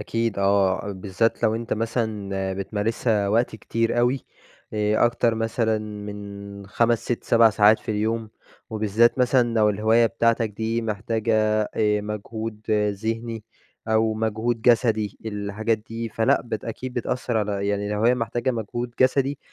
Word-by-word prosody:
أكيد 115 0 -2
آه، 100 0 +2
بالذات 100 +4 -1
لو 110 - +3
أنت 115 +1 -4
مثلًا 105 -4 -2
بتمارسها 105 +1 -1
وقت 115 +2 +1
كتير 115 +2 -1
أوي 125 +3 +1 0.5
آآ، 105 +1 +2
أكتر 120 -1 +1
مثلًا 115 0 0
من 100 -1 -8
5،6،7 115 +1 +2
ساعات 105 +1 +5
في - - -6
اليوم، 110 +1 -1 0.4
وبالذات 110 +3 +2
مثلًا 125 -2 +3
لو 110 -2 +4
الهواية 110 +3 +3
بتاعتَك 115 0 +1
دي 110 +2 -2
محتاجة 110 +1 -1 0.4
آآ، 105 -1 +2
مجهود 105 +1 -5 0.3
ذهني 115 +2 -4 0.4
أو 110 0 +2
مجهود 110 +1 -1
جسدي 110 -4 +2
الحاجات 105 +2 -1
دي، 115 +2 -6
فلأ، 110 0 +2
بت 110 -3 -5
أكيد 125 +3 -5
بتأثر 120 0 -2
على 100 -2 -1
يعني 100 0 -1
الهواية 105 +4 +2
محتاجة 120 +1 -1
مجهود 120 +1 -4
جسدي، 135 +2 +2
110 Hz, 130 wpm, -24 LUFS, 105-115 Hz, 0.5 s, ساعات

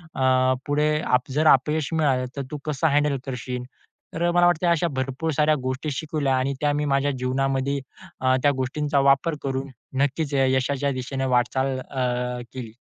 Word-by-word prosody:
अ, 130 -1 +3
पुढे 150 +1 +1 0.3
जर 150 +4 +1
अपयश 150 +3 +2
मिळालं, 140 -5 +2
तर 140 - -3
तू 150 - -3
कसं 150 +1 0
हँडल 145 -1 +2
करशील? 125 -1 -4 0.5
तर 165 - -2
अ, 175 - +2
मला 175 0 +5
वाटतंय 175 0 +3
अशा 170 0 +2
भरपूर 135 +5 -2
साऱ्या 150 0 +4
गोष्टी 130 +4 -2
शिकवल्या 145 -1 -1
आणि 135 +2 0
त्या 145 -1 +2
मी 150 0 -1
माझ्या 140 +1 +2
जीवनामध्ये 135 +2 0 0.4
अ, 130 0 +3
त्या 145 - +5
गोष्टींचा 140 +2 0
वापर 150 +4 +2
करून 135 0 -2 0.4
नक्कीच 145 +1 -1
यशाच्या 135 +1 +1
दिशेने 135 +1 -3
वाटचाल 130 +2 +1
अ, 125 -1 -2
केली. 125 -4 -7
135 Hz, 165 wpm, -24 LUFS, 130-150 Hz, 0.5 s, मला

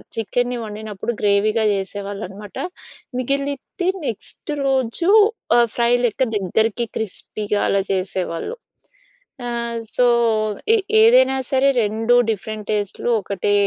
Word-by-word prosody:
చికెన్‌ని 245 +2 -1
వండినప్పుడు 215 0 -5
గ్రేవీగా 210 +2 +2
జేసేవాళ్ళనమాట. 200 0 -6 0.6
మిగిలిద్ది 280 +7 -2 0.2
నెక్స్ట్ 230 +6 -6 0.2
రోజు 265 +6 +1 0.5
ఆహ్, 235 -1 +5
ఫ్రై 235 0 +3
లెక్క 240 +3 +1
దగ్గరికి 220 +4 +1
క్రిస్పీగా 210 -1 -3
అలా 200 - +2
చేసేవాళ్ళు. 185 - -3 0.9
ఆహ్, 235 -1 -2 0.2
సో, 250 - +4 0.7
ఎ - - +4 0.3
ఏదైనా 460 - +5
సరే, 270 +1 +4
రెండు 225 +3 +1 0.2
డిఫరెంట్ 215 +1 -5
టేస్ట్‌లు 205 +2 -2
ఒకటే 200 +1 -1
220 Hz, 100 wpm, -21 LUFS, 205-245 Hz, 0.9 s, ఆహ్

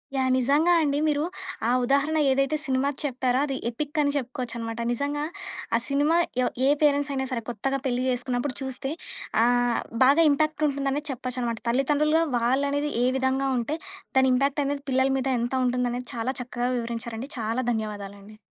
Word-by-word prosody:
Yeah! 260 -1 +2
నిజంగా 285 +7 +3
అండి. 285 -1 +1
మీరు 295 -1 +1 0.4
ఆ - - +2
ఉదాహరణ 280 +5 +2
ఏదైతే 275 +3 +2
సినిమా 265 0 +1
చెప్పారో 255 -2 0
అది 275 -2 -3
ఎపిక్ 295 +5 -3
అని 285 -1 +2
చెప్పుకోవచ్చనమాట. 240 -4 -4
నిజంగా 285 +4 -2 0.5
ఆ - - +5
సినిమా 290 +4 +2 0.3
ఎ - - +2 0.2
ఏ - - +5
పేరెంట్స్ 285 -1 +3
అయినా 265 -1 -1
సరే 240 -2 -1
కొత్తగా 270 +4 -1
పెళ్లి 250 -1 0
జేసుకున్నప్పుడు 250 +1 -1
చూస్తే 265 +1 -4 0.5
అహ్, 245 0 +2 0.2
బాగా 280 +5 +6
ఇంపాక్ట్ 310 +1 +1
ఉంటుందనే 280 0 -1
చెప్పొచ్చనమాట. 250 -2 -3
తల్లితండ్రులుగా 295 +5 +2
వాళ్ళనేది 280 +5 +1
ఏ - - +4
విధంగా 265 +1 +1
ఉంటే 265 +6 -2 0.4
దాని 265 0 +5
ఇంపాక్టనేది 280 +1 0
పిల్లల 260 +1 +3
మీద 265 0 -1
ఎంత 240 +2 -2
ఉంటుందనేది 245 0 -1
చాలా 235 +3 -1
చక్కగా 245 0 -2
వివరించారండి. 235 +1 -4
చాలా 225 +3 -1
ధన్యవాదాలండి. 205 -2 -5
260 Hz, 150 wpm, -26 LUFS, 245-285 Hz, 0.5 s, బాగా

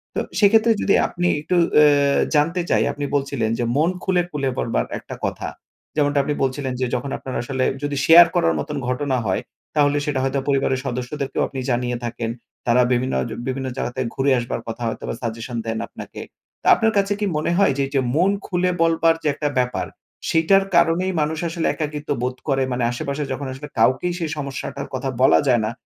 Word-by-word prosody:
তো - - +1 0.2
সেক্ষেত্রে 220 +2 +5
যদি 200 - +3
আপনি 175 0 -1
একটু 180 - -1 0.2
অ্যা 145 -2 +5 0.2
জানতে 165 +5 +2
চাই, - - +3
আপনি 145 - -4
বলছিলেন 140 -5 0
যে, - - +1
মন 160 +3 +3
খুলে, 185 -2 +2
খুলে 140 -3 -1
পড়বার - - 0
একটা - - -9
কথা। - - -3 0.5
যেমনটা 145 -1 +2
আপনি 150 - -1
বলছিলেন 130 0 -1
যে, - - +2
যখন 135 +3 -3
আপনার 130 - -7
আসলে 130 +1 -2 0.2
যদি 145 0 -1
শেয়ার 170 +1 +9
করার 80 0 +3
মতন 75 - -4
ঘটনা 130 +1 0
হয়, 95 -2 0 0.3
তাহলে 145 -1 +3
সেটা 145 -3 -1
হয়তো 135 +1 0
পরিবারের 135 -2 +1
সদস্যদেরকেও 130 +2 -3
আপনি 135 - -6
জানিয়ে 120 0 0
থাকেন, 120 -1 -3 0.4
তারা 120 +1 +5
বিভিন্নজ 125 - 0 0.2
বিভিন্ন 130 0 -2
জায়গাতে 130 0 -3
ঘুরে 135 +1 +2
আসবার 120 - -4
কথা 115 +1 -5
হয়তোবা - - -4
সাজেশন 115 +1 -4
দেন 115 0 -2
আপনাকে। - - -9 0.4
তা - - -3
আপনার 220 0 +1
কাছে 200 +1 +2
কি 210 - 0
মনে 155 - 0
হয় 200 -8 +4
যে, 140 - +1
এইযে 135 -1 0
মন 180 +5 +4
খুলে 180 -1 0
বলবার 165 0 +3
যে - - 0
একটা 145 +1 -2
ব্যাপার, 125 0 0 0.4
সেইটার 180 +5 +4
কারণেই 170 +2 +3
মানুষ 155 +1 -1
আসলে 165 0 -1
একাকিত্ব 150 -1 -4
বোধ 125 0 -1
করে, 135 -2 +2
মানে 125 0 -1
আশেপাশে 140 +4 -3
যখন 135 +1 -3
আসলে 140 +3 -8
কাউকেই 130 +10 +3
সেই 165 -2 -2
সমস্যাটার 140 0 -5
কথা 130 +1 -2
বলা 130 - +6
যায় 120 -3 +4
না, 110 - -2
140 Hz, 190 wpm, -21 LUFS, 125-160 Hz, 0.5 s, শেয়ার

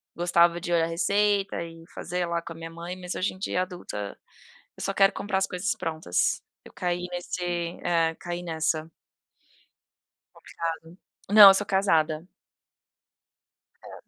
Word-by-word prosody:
gostava 175 0 +3
de 175 - -4
olhar 165 -1 +3
receita 200 +3 +1
e 165 0 -11
fazer 180 +1 -3
lá 170 0 -1
com 165 - -8
a - - -16
minha 165 0 -8
mãe, 170 +2 -7
mas 180 -1 -6
hoje 185 - -1
em 185 - -15
dia, 185 -2 0
adulta, 175 - -7 0.6
eu - - -8
só 195 - -1
quero 195 0 +5
comprar 200 -1 -2
as 190 - +1
coisas 185 +4 -2
prontas, 160 - -1 0.2
eu - - -14
caí 180 0 -2
nesse 180 0 -4 0.4
eh, 165 -2 +2
caí 175 0 -5
nessa. 160 -1 -1 1.5
Complicado. - - -16 0.8
Não, 210 -1 +11
eu - - +6
sou 205 +1 -1
casada. 165 -4 +1 1.5
É. - - -11
175 Hz, 150 wpm, -26 LUFS, 165-190 Hz, 1.5 s, Não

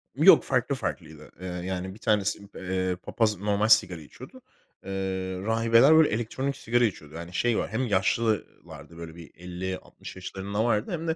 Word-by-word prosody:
Yok, - - +7
farklı - - 0
farklıydı. 75 -1 -6
Eee, 95 - -5
yani 90 +1 -4
1 110 - -15
tanesi, 105 -3 +1 0.2
eee, 95 -1 -2
Papaz 105 -4 0
normal 105 +2 0
sigara 90 -7 +4
içiyordu. 130 - -13 0.4
Eee, 95 - -7 0.5
rahibeler 115 +6 +4
böyle 160 -1 +6
elektronik 130 +5 -2
sigara 120 +1 +1
içiyordu. 80 -7 -5
Yani 85 +1 -8
şey 115 +5 +1
var - - -2
hem 120 +4 -1
yaşlı 100 +3 +1
ııı, 105 - -6
lardı 85 - -12
böyle 85 -1 -9
bi 85 -2 -12
50-60 90 +2 -7
yaşlarında 100 +3 -4
vardı 110 -2 0
hem 165 -1 -3
de 160 - 0
100 Hz, 170 wpm, -27 LUFS, 90-115 Hz, 0.5 s, Yok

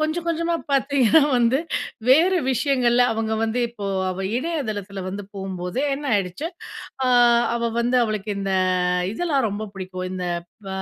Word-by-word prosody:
கொஞ்சம் 315 +2 -1
கொஞ்சமா 335 0 0 0.2
பார்த்தீங்கன்னா 275 0 +4 0.2
வந்து 240 +2 +3 0.5
வேற 330 +8 +5 0.2
விஷயங்கள்ல 250 -2 +2
அவங்க 220 0 -2
வந்து 225 +2 0
இப்போ 210 -4 -7 0.2
அவ 185 +1 -5 0.2
இணையதளத்தில 220 - -3
வந்து 200 +2 -5
போம்போதே 190 +3 -4
என்ன 285 +1 -6
ஆயிடுச்சி, 195 - -2 0.6
அ - - +1 0.5
அவ 235 0 0
வந்து 245 +2 +1
அவளுக்கு 215 -1 -3
இந்த 195 -1 -2 0.6
இதெல்லாம் 280 -3 0
ரொம்ப 205 +1 -4
பிடிக்கும். 185 -1 -6
இந்த 180 -1 -4 0.4
ப - - -6
235 Hz, 140 wpm, -23 LUFS, 200-280 Hz, 0.6 s, வேற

